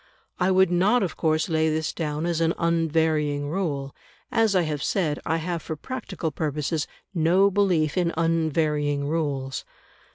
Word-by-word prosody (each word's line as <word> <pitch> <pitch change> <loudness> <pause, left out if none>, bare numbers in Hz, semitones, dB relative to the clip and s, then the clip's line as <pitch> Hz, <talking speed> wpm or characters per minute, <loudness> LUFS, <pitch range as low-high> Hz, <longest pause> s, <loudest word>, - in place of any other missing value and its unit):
I 180 +1 +2
would 190 -1 +4
not 200 +7 +3
of 180 - -3
course 155 -1 +1
lay 160 -2 +2
this 155 0 -1
down 155 -1 -2
as 170 -1 0
an 165 0 +2
unvarying 160 -3 +1
rule; 145 -7 -2 0.4
as 225 -3 +2
I 180 - +4
have 150 -3 -3
said, 155 -5 0
I 160 - +1
have 170 0 -3
for 160 - -5
practical 190 - -5
purposes 150 +1 -2 0.3
no 180 +4 +4
belief 180 -7 +2
in 170 -2 +1
unvarying 155 -3 +1
rules. 145 -4 -2
160 Hz, 155 wpm, -25 LUFS, 150-175 Hz, 0.4 s, would